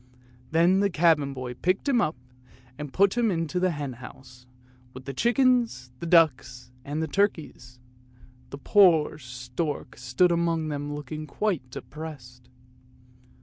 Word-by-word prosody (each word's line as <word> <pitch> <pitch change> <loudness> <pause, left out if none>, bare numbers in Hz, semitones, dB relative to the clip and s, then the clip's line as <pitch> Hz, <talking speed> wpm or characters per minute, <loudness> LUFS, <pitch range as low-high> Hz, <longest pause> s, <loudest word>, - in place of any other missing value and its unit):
Then 170 +4 +3
the 200 0 +2
cabin 160 -5 +2
boy 130 -2 -6
picked 185 - -1
him 255 -4 +3
up 155 - 0 0.6
and 150 -2 -6
put 195 +5 +3
him 240 -2 +2
into 165 -1 -1
the 185 0 +2
henhouse, 130 -4 -8 0.5
with 130 0 -10
the 135 - -5
chickens, 235 - +1
and 170 - -4
ducks 130 -7 +2
and 155 +2 -4
turkeys; 165 -10 -2 0.7
the 140 - -8
poor 160 -2 +4
stork 125 0 -5
stood 125 +9 +2
among 165 -2 0
them 145 0 -4
looking 155 +2 -7
quite 165 -6 -2
depressed. 125 -4 -10
155 Hz, 130 wpm, -26 LUFS, 130-180 Hz, 0.7 s, poor